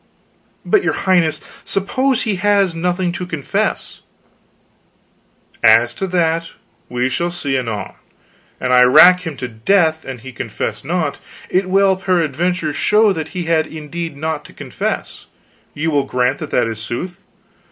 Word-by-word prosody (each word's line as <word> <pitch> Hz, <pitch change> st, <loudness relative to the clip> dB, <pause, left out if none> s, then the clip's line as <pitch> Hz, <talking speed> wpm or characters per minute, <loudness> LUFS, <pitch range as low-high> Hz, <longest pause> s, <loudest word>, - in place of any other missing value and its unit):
"But, 410 Hz, -2 st, +3 dB
your -, -, +1 dB
Highness, 170 Hz, -5 st, +2 dB, 0.2 s
suppose 235 Hz, +7 st, 0 dB
he 210 Hz, -5 st, -1 dB
has 200 Hz, -1 st, +2 dB
nothing 175 Hz, +2 st, -1 dB
to 175 Hz, -, -5 dB
confess?" 160 Hz, -6 st, -2 dB, 1.6 s
"As 115 Hz, +2 st, +5 dB
to 195 Hz, -, -3 dB
that, 165 Hz, -2 st, 0 dB, 0.4 s
we 125 Hz, +1 st, 0 dB
shall 170 Hz, +7 st, -1 dB
see, 145 Hz, -6 st, -2 dB
anon. 115 Hz, -5 st, -3 dB, 0.7 s
An 125 Hz, -, -1 dB
I 125 Hz, 0 st, +6 dB
rack 175 Hz, +8 st, +7 dB
him 150 Hz, -4 st, -5 dB
to 125 Hz, -, -4 dB
death 160 Hz, -, +1 dB
and 130 Hz, -3 st, -8 dB
he 130 Hz, +2 st, -9 dB
confess 120 Hz, -, -5 dB
not, -, -, -2 dB, 0.3 s
it 185 Hz, 0 st, +1 dB
will 195 Hz, 0 st, +3 dB
peradventure 175 Hz, -2 st, 0 dB
show 210 Hz, +5 st, +3 dB
that 160 Hz, -3 st, -5 dB
he 180 Hz, -, -1 dB
had 160 Hz, -1 st, +1 dB
indeed 160 Hz, 0 st, -6 dB
naught 155 Hz, 0 st, -3 dB
to -, -, -14 dB
confess -, -, -5 dB, 0.5 s
ye 150 Hz, -, -3 dB
will 150 Hz, -3 st, +2 dB
grant 125 Hz, +1 st, 0 dB
that 155 Hz, -, -6 dB
that 125 Hz, -, +2 dB
is 115 Hz, -1 st, -4 dB
sooth? 175 Hz, -, -5 dB
165 Hz, 150 wpm, -18 LUFS, 135-185 Hz, 1.6 s, rack